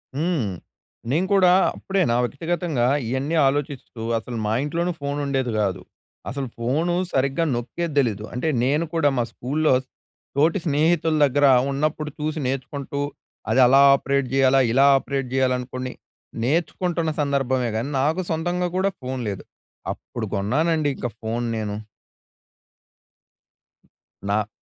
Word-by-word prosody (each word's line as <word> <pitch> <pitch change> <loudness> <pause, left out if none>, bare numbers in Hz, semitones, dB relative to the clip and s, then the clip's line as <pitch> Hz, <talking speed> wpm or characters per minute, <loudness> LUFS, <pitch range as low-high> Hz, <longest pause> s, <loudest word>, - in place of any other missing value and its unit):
హ్మ్. 155 - 0 0.6
నేను 165 +7 +2
కూడా 185 -2 +5 0.2
అప్పుడే 195 0 -1
నా 120 - +2
వ్యక్తిగతంగా 160 0 -1 0.2
ఇయన్నీ 135 +6 -1
ఆలోచిస్తూ 135 -4 -3 0.2
అసలు 115 +1 -5
మా 105 - 0
ఇంట్లోనూ 170 +4 -1
ఫోన్ 140 0 -2
ఉండేది 135 -3 -1
కాదు. 95 -3 -1 0.5
అసలు 135 +2 -3
ఫోను 145 +9 0 0.2
సరిగ్గా 135 +5 +1
నొక్కేది 155 +7 -3
తెలీదు. 110 -6 0
అంటే 125 +6 -2 0.2
నేను 145 +6 +2
కూడా 155 -3 +3
మా 120 - +2
స్కూల్‌లో 150 +4 0 0.6
తోటి 165 +6 +3
స్నేహితుల 160 +1 +2
దగ్గర 145 +1 +2 0.3
ఉన్నప్పుడు 150 +2 -1
చూసి 155 +1 -2
నేర్చుకుంటూ, 140 +2 -4 0.5
అది 130 - +3
అలా 135 +2 +6
ఆపరేట్ 140 -1 +1
చేయాలా, 135 0 +4
ఇలా 135 +3 +5
ఆపరేట్ 135 -1 -3
చేయాలనుకోనీ 130 -1 -1 0.5
నేర్చుకుంటున్న 170 +3 0
సందర్భమే 130 -3 0
కానీ, 115 +5 -2
నాకు 160 +6 +1
సొంతంగా 175 +2 -1
కూడా 195 +1 +2
ఫోన్ 130 0 -4
లేదు. 100 - -5 0.5
అప్పుడు 120 -2 -7
కొన్నానండి 150 +10 +1
ఇంక 125 - -3
ఫోన్ 115 +2 -2
నేను. 105 -2 -3 2.5
నా 100 +1 0
140 Hz, 125 wpm, -23 LUFS, 125-160 Hz, 2.5 s, అలా